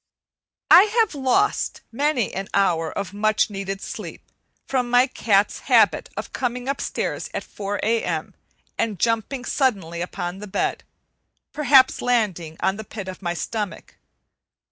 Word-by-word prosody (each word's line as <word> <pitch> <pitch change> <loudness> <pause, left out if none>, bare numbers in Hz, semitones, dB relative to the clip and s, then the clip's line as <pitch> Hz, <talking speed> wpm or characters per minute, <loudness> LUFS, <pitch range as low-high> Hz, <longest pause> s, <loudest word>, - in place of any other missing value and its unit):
I 380 - +10
have 440 -6 +3
lost 290 +10 +1
many 275 -2 0
an 195 +1 -4
hour 170 -5 +2
of 200 -1 -5
much 215 +1 +1
needed 195 0 -4
sleep - - -7 0.4
from 250 -2 -1
my 245 +1 +5
cat's 210 -6 +1
habit - - +4
of - - -6
coming 250 0 -3
upstairs 275 0 -3
at - - -2
four 205 0 -5
A.M. 225 +1 -1 0.5
and 215 -4 0
jumping 230 +4 0
suddenly 195 - 0
upon 175 +1 -4
the 210 - -8
bed; 190 - -1 0.7
perhaps 275 -3 +5
landing 190 -10 0
on 190 - +1
the 220 - -6
pit 205 -2 -8
of 185 +1 -7
my 175 -2 -2
stomach. 205 +2 -5
215 Hz, 140 wpm, -23 LUFS, 195-250 Hz, 0.7 s, I